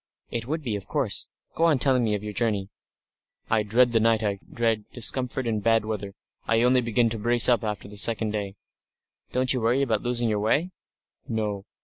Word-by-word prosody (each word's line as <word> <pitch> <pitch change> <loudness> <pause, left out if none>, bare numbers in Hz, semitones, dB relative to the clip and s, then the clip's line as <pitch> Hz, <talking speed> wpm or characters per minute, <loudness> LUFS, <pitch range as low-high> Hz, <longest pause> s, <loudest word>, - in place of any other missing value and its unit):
"It 115 0 -4
would 155 +2 -3
be, 115 -5 -2
of 100 - -7
course. 135 -9 -1 0.3
Go 165 - +1
on 160 -4 +4
telling 130 -2 +2
me 110 -2 +1
of 105 - -5
your 105 0 -5
journey." 105 -4 -1 0.8
"I 110 -1 +3
dread 120 +4 +3
the 115 - +3
night. 115 0 +2
I 100 -2 -1
dread 115 -3 0
discomfort 125 +2 -1
and 110 -2 -1
bad 115 0 +2
weather. 105 -2 -5 0.3
I 115 0 +3
only 125 +1 +4
begin 115 0 +1
to 115 - -3
brace 120 +2 +4
up 120 -3 +3
after 105 -2 -4
the 105 0 -11
second 110 +1 0
day." 100 -2 -4 0.8
"Don't 130 +1 +2
you 125 - -1
worry 120 +5 +2
about 110 -5 0
losing 120 -1 +1
your 105 -2 0
way?" 145 - +1 0.6
"No. 105 -3 -3
115 Hz, 205 wpm, -25 LUFS, 105-125 Hz, 0.8 s, on